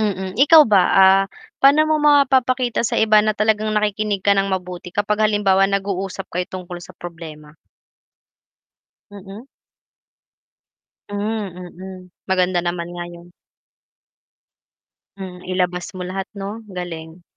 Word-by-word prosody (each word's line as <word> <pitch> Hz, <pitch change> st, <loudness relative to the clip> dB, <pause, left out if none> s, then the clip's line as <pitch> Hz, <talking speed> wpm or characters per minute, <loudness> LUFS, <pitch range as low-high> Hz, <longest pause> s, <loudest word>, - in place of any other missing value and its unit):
Mm, 190 Hz, -1 st, -3 dB
ikaw 315 Hz, 0 st, +8 dB
ba? 190 Hz, -2 st, +6 dB, 0.2 s
Ah, 195 Hz, +1 st, +5 dB, 0.4 s
pa'no 285 Hz, +3 st, +6 dB
mo 310 Hz, -, +3 dB
mapapakita 260 Hz, -3 st, +2 dB
sa 240 Hz, -, -3 dB
iba 215 Hz, -1 st, +5 dB
na 215 Hz, 0 st, +1 dB
talagang 215 Hz, 0 st, +1 dB
nakikinig 210 Hz, -1 st, -1 dB
ka -, -, +5 dB
ng 195 Hz, 0 st, +1 dB
mabuti, 180 Hz, -1 st, -7 dB
kapag 210 Hz, +1 st, 0 dB
halimbawa 200 Hz, -2 st, +2 dB
nag-uusap 195 Hz, -1 st, -3 dB
kayo 180 Hz, +1 st, -2 dB
tungkol 180 Hz, -1 st, -7 dB
sa -, -, -13 dB
problema? 160 Hz, -3 st, -10 dB, 1.6 s
Mm. 200 Hz, +3 st, -11 dB, 1.7 s
Hmm, 205 Hz, 0 st, -3 dB
mm. 185 Hz, +1 st, -10 dB, 0.3 s
Maganda 185 Hz, -1 st, +1 dB
naman 175 Hz, 0 st, -3 dB
nga 175 Hz, 0 st, -5 dB
'yun. 175 Hz, 0 st, -14 dB, 1.8 s
Hmm, 185 Hz, -2 st, -9 dB
ilabas 180 Hz, 0 st, -2 dB
mo 185 Hz, -2 st, -7 dB
lahat 190 Hz, +1 st, -4 dB
'no? 205 Hz, +3 st, -7 dB
Galing. 170 Hz, -1 st, -8 dB
195 Hz, 120 wpm, -20 LUFS, 180-210 Hz, 1.8 s, ikaw